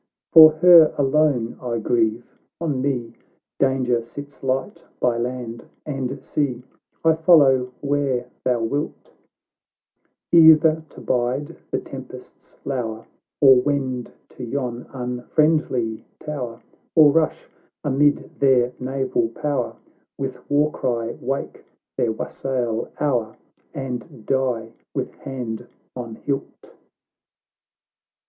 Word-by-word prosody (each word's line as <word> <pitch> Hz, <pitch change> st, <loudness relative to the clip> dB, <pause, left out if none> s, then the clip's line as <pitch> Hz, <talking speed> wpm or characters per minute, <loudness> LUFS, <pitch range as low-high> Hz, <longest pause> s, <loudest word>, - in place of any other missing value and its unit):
For 155 Hz, -1 st, +10 dB
her 165 Hz, -1 st, +7 dB
alone 135 Hz, -4 st, +1 dB
I 120 Hz, -2 st, -2 dB
grieve 115 Hz, 0 st, 0 dB, 0.2 s
— -, -, -58 dB
on 150 Hz, -6 st, -1 dB
me 125 Hz, -4 st, -2 dB, 0.5 s
Danger 130 Hz, -3 st, +2 dB
sits 140 Hz, +5 st, -11 dB
light 130 Hz, 0 st, -2 dB, 0.2 s
by 125 Hz, -1 st, +2 dB
land 120 Hz, -1 st, -5 dB, 0.2 s
and 135 Hz, -2 st, -4 dB
sea, 130 Hz, -5 st, -2 dB, 0.4 s
I 160 Hz, -, +6 dB
follow 145 Hz, -6 st, +4 dB
where 140 Hz, -3 st, 0 dB, 0.2 s
thou 125 Hz, -2 st, +1 dB
wilt; 140 Hz, +6 st, -3 dB, 1.2 s
Either 160 Hz, -1 st, +7 dB
to -, -, -13 dB
bide 125 Hz, +3 st, -1 dB
the -, -, -1 dB
tempest's -, -, -12 dB
lour, 115 Hz, -4 st, -3 dB, 0.4 s
Or 135 Hz, -2 st, +8 dB
wend 130 Hz, -3 st, -2 dB, 0.2 s
to 125 Hz, -, -10 dB
yon 120 Hz, -1 st, -4 dB
unfriendly 125 Hz, -1 st, 0 dB
tower, 125 Hz, -6 st, -6 dB, 0.3 s
Or 155 Hz, -3 st, +8 dB
rush 160 Hz, +1 st, 0 dB, 0.4 s
amid 145 Hz, 0 st, +1 dB
their 125 Hz, -2 st, +3 dB
naval 130 Hz, -3 st, -1 dB
power, 130 Hz, 0 st, -2 dB, 0.4 s
"With 130 Hz, -2 st, -6 dB
war 145 Hz, +1 st, +3 dB
cry 120 Hz, -4 st, -2 dB
wake 135 Hz, +3 st, -4 dB, 0.3 s
their 115 Hz, -, +1 dB
wassail 120 Hz, 0 st, -3 dB
hour, 120 Hz, -7 st, -1 dB, 0.3 s
And 125 Hz, -6 st, -6 dB
die 125 Hz, -4 st, -1 dB, 0.2 s
with -, -, -3 dB
hand 120 Hz, -3 st, -6 dB, 0.3 s
on 120 Hz, -3 st, -6 dB
hilt." 140 Hz, +3 st, -5 dB
130 Hz, 110 wpm, -22 LUFS, 120-145 Hz, 1.2 s, For